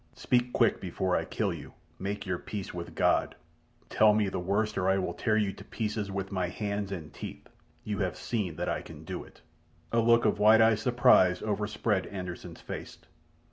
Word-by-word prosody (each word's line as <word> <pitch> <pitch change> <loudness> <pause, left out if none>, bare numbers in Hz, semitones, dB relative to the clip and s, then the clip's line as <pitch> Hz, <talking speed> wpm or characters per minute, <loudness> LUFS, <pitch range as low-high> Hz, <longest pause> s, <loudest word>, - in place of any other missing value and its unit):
Speak 125 0 +1
quick 115 -3 +2
before 90 0 -1
I - - 0
kill - - -1
you! - - -9 0.3
Make 100 +2 -3
your 90 -2 -2
peace 100 -3 -6
with 85 -1 -7
God! - - +2 0.5
Tell 105 -1 +5
me 105 -2 +2
the 95 - -3
worst, 100 +4 0
or 95 - +1
I 95 - +3
will 95 - -1
tear 110 -2 +1
you 100 -3 +1
to 100 - -11
pieces 105 -1 -3
with 95 0 -4
my 95 -2 0
hands 100 +1 -3
and 85 -6 -6
teeth. - - -8 0.4
You 105 -1 -3
have 95 -3 -1
seen 100 -9 -2
that 90 +2 -3
I - - -1
can - - -11
do - - -5
it!" - - -18 0.5
A 115 - +3
look 115 0 +4
of 105 -1 +2
wide 110 +2 +7
eyed 110 -1 +5
surprise 95 -7 +4
overspread 105 -1 -1
Anderssen's 90 -3 -7
face. - - -7
100 Hz, 195 wpm, -29 LUFS, 95-110 Hz, 0.5 s, wide